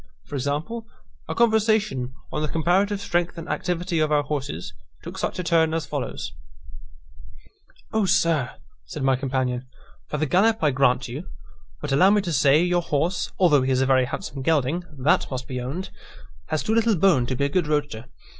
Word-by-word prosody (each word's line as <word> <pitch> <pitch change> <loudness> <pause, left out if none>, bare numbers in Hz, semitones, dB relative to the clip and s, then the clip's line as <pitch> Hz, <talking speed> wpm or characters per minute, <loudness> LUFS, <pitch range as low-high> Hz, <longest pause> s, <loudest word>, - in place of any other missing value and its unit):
For - - -14
example, 150 - -3 0.4
a - - -2
conversation 215 - +2 0.2
on - - -2
the 155 - 0
comparative 185 +6 +1
strength 175 -3 -1
and 165 - -7
activity 180 -1 -1
of 155 -1 +1
our 145 -1 +3
horses, 130 - -4 0.3
took - - -8
such - - -2
a 180 - -2
turn 165 -2 +2
as 165 - -2
follows: - - -4 1.6
"O 220 -2 +2
sir," 160 -8 +2 0.3
said 150 - -6
my 135 0 +3
companion, 130 -1 -2 0.4
"for 150 - -3
the 155 - 0
gallop 205 +9 +3
I 150 - +4
grant 130 0 +2
you; 140 +10 -7 0.5
but 150 - -4
allow 180 +8 +5
me 205 0 +4
to 175 -4 -3
say, 145 +3 +4
your 175 0 +2
horse 170 +3 -1
(although 160 -7 +5
he 130 +1 0
is 130 0 +2
a - - +3
very 130 -1 +3
handsome 140 0 -5
gelding 155 +3 +1
that 140 +4 +2
must 130 -1 -5
be 130 -3 -4
owned,) 145 +10 -5 0.6
has 155 - -1
too 220 - 0
little 230 -1 +3
bone 165 -9 +3
to 130 - -1
be 140 - 0
a - - 0
good 175 +1 0
roadster. 145 -6 -1
155 Hz, 185 wpm, -24 LUFS, 135-180 Hz, 1.6 s, allow